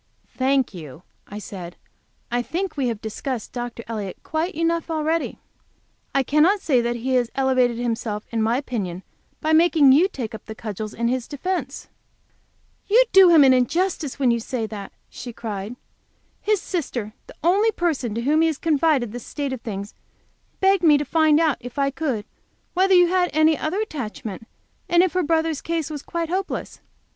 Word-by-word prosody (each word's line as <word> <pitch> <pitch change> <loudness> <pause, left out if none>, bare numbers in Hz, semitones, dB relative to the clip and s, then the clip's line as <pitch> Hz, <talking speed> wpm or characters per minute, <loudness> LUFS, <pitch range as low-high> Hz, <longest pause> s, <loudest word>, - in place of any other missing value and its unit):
"Thank 265 -2 +1
you," 160 -2 -10 0.2
I 205 - -8
said, 185 -5 -8 0.6
"I 245 0 +1
think 360 +9 -3
we 275 -4 0
have 225 -3 -3
discussed 220 +2 -4
Dr. 240 -1 -5
Elliott 210 -5 -5
quite 320 +5 -2
enough 335 +1 0
already. 320 +1 -1 0.8
I 275 - +4
cannot 310 - +3
say 265 -9 +2
that 240 0 -1
he 255 +3 -2
has 245 -2 +2
elevated 255 -3 +2
himself 230 -3 -2
in 230 -1 0
my 225 +3 +2
opinion 195 -10 -4 0.4
by 315 +1 +1
making 320 -4 +6
you 315 +8 +5
take 250 - -6
up 220 - -8
the 220 - -7
cudgels 215 -1 -6
in 235 +1 0
his 250 0 -1
defence." 295 -2 -4 1.0
"You 460 +5 +6
do 380 -1 +8
him 325 -4 +7
injustice, 275 +4 +2
when 260 -4 +3
you 235 - +1
say 230 0 -3
that," 210 -2 -7 0.2
she 240 - -8
cried. 215 -1 -5 0.7
"His 425 -1 +1
sister, 250 - -4
the - - -13
only 395 +6 +4
person 300 - -1
to 230 - -1
whom 300 +6 +2
he 325 0 +3
confided 295 -6 +1
the 245 - -6
state 280 +3 -4
of 255 - -6
things, 200 -2 -6 0.7
begged 385 -1 +4
me 310 -4 +6
to 290 - -2
find 315 -1 +3
out, 315 -5 +2
if 245 +2 -10
I 275 -1 +1
could, 265 -8 -2 0.5
whether 380 +1 +4
you 355 0 +7
had 360 -1 +2
any 310 +1 +4
other 315 +7 -2
attachment, 225 - -6 0.4
and 345 0 +5
if 370 - 0
her 365 - +2
brother's 320 -2 0
case 330 -2 -2
was 295 -2 -5
quite 335 +1 -4
hopeless. 380 +2 -3
275 Hz, 175 wpm, -23 LUFS, 230-330 Hz, 1.0 s, do